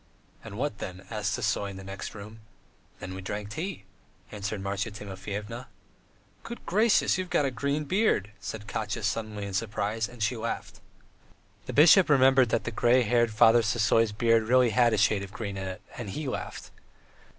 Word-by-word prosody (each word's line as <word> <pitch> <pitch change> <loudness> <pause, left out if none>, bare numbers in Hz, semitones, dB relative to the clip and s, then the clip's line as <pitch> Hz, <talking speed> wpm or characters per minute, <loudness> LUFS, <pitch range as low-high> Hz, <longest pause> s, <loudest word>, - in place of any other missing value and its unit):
"And 105 -2 -9
what 125 -5 -2
then?" 95 0 -7
asked - - -1
Sisoy 100 - -1
in 95 - -8
the 95 - -9
next 95 +2 -7
room. 105 +2 -10 0.6
"Then 95 - -7
we 95 - -6
drank 105 +2 -5
tea.. 165 - -5 0.2
." - - -31
answered 105 0 -4
Marya 100 +3 -2
Timofyevna. 105 +4 -7 0.7
"Good 235 +1 -9
gracious, 210 0 +3
you've 185 -1 -4
got 145 - +2
a 135 - 0
green 140 +5 -1
beard," 175 - +1
said 105 -1 -6
Katya 110 +1 -3
suddenly 105 -1 -2
in 100 - -6
surprise, 105 +2 -2
and 120 -2 -5
she 115 +4 +1
laughed. 110 - -5 0.9
The - - -4
bishop 165 +5 +7
remembered 135 -3 +5
that 115 - 0
the 115 - -4
grey 120 +3 +3
headed 120 0 +2
Father 115 +2 +6
Sisoy's 115 0 +2
beard 115 +1 +2
really 125 -1 +4
had 120 0 +4
a - - +1
shade 100 0 +3
of 100 -1 -8
green 105 -2 -5
in 95 0 -4
it, 95 +2 -7
and 120 -5 -6
he 150 +9 -4
laughed. 130 - -5
110 Hz, 185 wpm, -28 LUFS, 100-125 Hz, 0.9 s, bishop